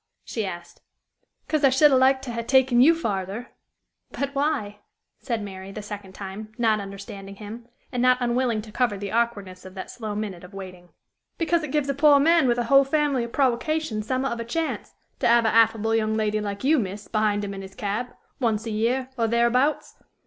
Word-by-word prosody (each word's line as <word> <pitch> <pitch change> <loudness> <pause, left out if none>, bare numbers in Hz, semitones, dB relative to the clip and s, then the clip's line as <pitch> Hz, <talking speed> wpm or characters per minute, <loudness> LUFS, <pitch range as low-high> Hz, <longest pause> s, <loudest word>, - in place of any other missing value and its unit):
she 220 -4 -3
asked. 175 -1 -9 0.7
"'Cause 310 -2 0
I 275 - +7
should 280 +3 +5
ha' - - +5
liked 265 +1 +4
to 245 - -5
ha' 230 - -2
taken 260 0 +4
you 325 +6 +7
farther." 205 - -3 0.6
"But 280 0 -4
why?" 275 -8 -1 0.4
said 230 -5 -3
Mary, 190 -1 -8
the 210 +1 -7
second 205 -2 -8
time, 200 +2 -8
not 220 -3 +2
understanding 195 0 -8
him, 220 +3 -9 0.2
and 250 -2 -1
not 255 0 +5
unwilling 240 -2 0
to 215 - -12
cover 225 -2 0
the 200 0 -5
awkwardness 205 -6 -1
of 185 0 -12
that 190 - -7
slow 220 -4 -5
minute 205 -5 -5
of 185 +2 -12
waiting. 180 -2 -9 0.5
"Because 335 0 +1
it 305 -3 -5
gives 295 -2 0
a 275 - 0
poor 285 0 +5
man 325 0 +4
with 240 -1 +2
a 240 - +1
whole 275 +4 +6
family 280 -2 +1
o' - - -4
prowocations 260 -2 0
some'at 260 +1 0
of 235 - -3
a - - -2
chance, 320 +8 -3 0.2
to - - +2
'ave 235 -1 +4
a - - +2
affable 225 -1 +3
young 220 -1 +1
lady 215 -1 0
like 200 +1 -5
you, 300 +2 +4
miss, 205 -1 -5
behind 210 -2 0
him 200 - -5
in 195 - -6
his 190 0 -11
cab, 210 +4 -2 0.3
once 225 -3 0
a 225 - -3
year, 245 +5 0
or 230 - +2
thereabouts. 235 +5 +1
230 Hz, 205 wpm, -24 LUFS, 205-265 Hz, 0.7 s, I